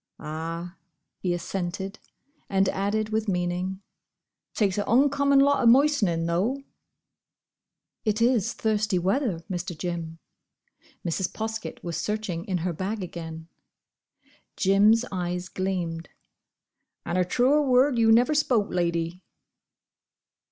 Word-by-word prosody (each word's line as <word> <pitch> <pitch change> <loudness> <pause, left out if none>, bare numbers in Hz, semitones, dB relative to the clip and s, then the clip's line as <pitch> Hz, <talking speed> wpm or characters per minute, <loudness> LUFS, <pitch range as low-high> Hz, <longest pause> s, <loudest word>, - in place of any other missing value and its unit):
"Ah," 165 +3 -6 0.4
he 180 - -1
assented, 185 +3 -4 0.5
and 195 -1 +2
added 210 +3 -1
with 220 0 -1
meaning, 180 +1 -2 0.7
"takes 200 -2 +1
a 205 - -1
oncommon 280 +3 +3
lot 280 +1 +4
o' 240 - +4
moistenin', 230 - +4
though." 205 +12 0 1.4
"It 215 -1 0
is 235 -3 +2
thirsty 215 -3 0
weather, 190 - 0
Mr. 180 -2 -4
Jim." 170 -1 -4 0.9
Mrs. 175 +2 -1
Poskett 220 0 -5
was 170 -2 -3
searching 195 -3 -3
in 185 -2 -1
her 180 - -1
bag 195 +5 -3
again. 165 -2 -7 1.1
Jim's 210 +4 +4
eyes 180 -1 -3
gleamed. 175 -4 -3 1.0
"And 170 - -2
a - - +4
truer 255 +11 +3
word 260 -1 +3
you 225 -1 +5
never 245 +6 +5
spoke, 245 -8 +1
Lady." 170 0 -1
195 Hz, 115 wpm, -26 LUFS, 175-225 Hz, 1.4 s, you